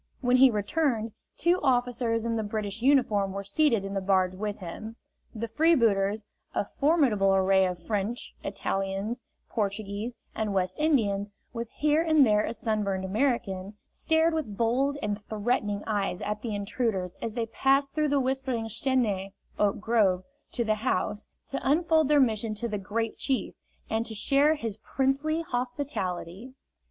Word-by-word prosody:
When 250 -1 +4
he 265 +1 +8
returned, 225 +1 0 0.3
two 345 +3 +3
officers 245 -3 +1
in 230 0 0
the 225 - 0
British 210 0 -3
uniform 225 -8 +3
were 200 0 -4
seated 230 0 +2
in 195 - -5
the 195 - -1
barge 185 -1 +2
with 205 +2 -4
him. 215 +5 -7 0.4
The 230 +1 -3
freebooters, 225 -7 +2 0.3
a - - +1
formidable 250 - +3
array 190 0 +4
of 175 -2 -6
French, 215 +2 -2
Italians, 195 +5 -2 0.3
Portuguese 210 +2 -3 0.2
and 215 -2 -2
West 185 +3 -1
Indians, 210 -10 +1 0.2
with 235 -1 -4
here 300 +2 +2
and 315 -4 +5
there 210 -2 +3
a - - -2
sunburned 210 -5 -1
American, 205 -3 -1
stared 320 +1 +1
with 255 -11 -3
bold 260 +5 +1
and 205 0 -2
threatening 210 -1 -1
eyes 200 -4 -1
at 210 +1 -3
the 220 -3 -3
intruders 200 -3 -2
as 225 -1 -4
they 235 -2 0
passed 270 +4 +1
through 305 -1 +1
the 285 0 +2
whispering 260 -3 -1
chęnaié 220 -5 0 0.3
(oak 205 -1 +2
grove) 205 -4 +2 0.3
to 240 - 0
the 215 - +2
house, 210 -3 -1 0.2
to 275 - -2
unfold 315 +1 +3
their 295 0 +4
mission 220 -4 +1
to 235 +3 -3
the 210 -2 -3
"Great 220 +3 -3
Chief," 265 -2 -1 0.3
and 220 +1 0
to 220 - -6
share 280 +8 +3
his 225 -7 -4
princely 275 +7 0
hospitality. 245 - -4
225 Hz, 155 wpm, -28 LUFS, 200-265 Hz, 0.4 s, he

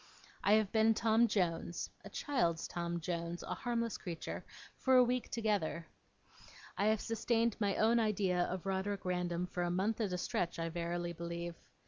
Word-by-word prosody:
I 205 - +5
have 215 -2 +3
been 220 0 +4
Tom 225 +1 +4
Jones 175 -4 -1
(a - - -8
child's 170 - 0
Tom 170 0 -3
Jones, 170 0 -3
a - - -3
harmless 235 -2 -2
creature) 170 -3 -5 0.4
for 260 -1 +4
a 250 - +8
week 245 0 0
together. 205 -7 0 0.9
I 200 - +1
have 215 0 +3
sustained 230 0 +1
my 200 -2 +1
own 230 +2 +4
idea 195 -5 +2
of 185 0 -4
Roderick 195 0 -1
Random 180 -1 0
for 180 0 -4
a 175 - +1
month 200 +6 0
at 205 -4 0
a 180 - -1
stretch, 175 0 -1
I 165 0 -2
verily 170 +1 -2
believe. 170 0 -4
190 Hz, 170 wpm, -35 LUFS, 175-220 Hz, 0.9 s, a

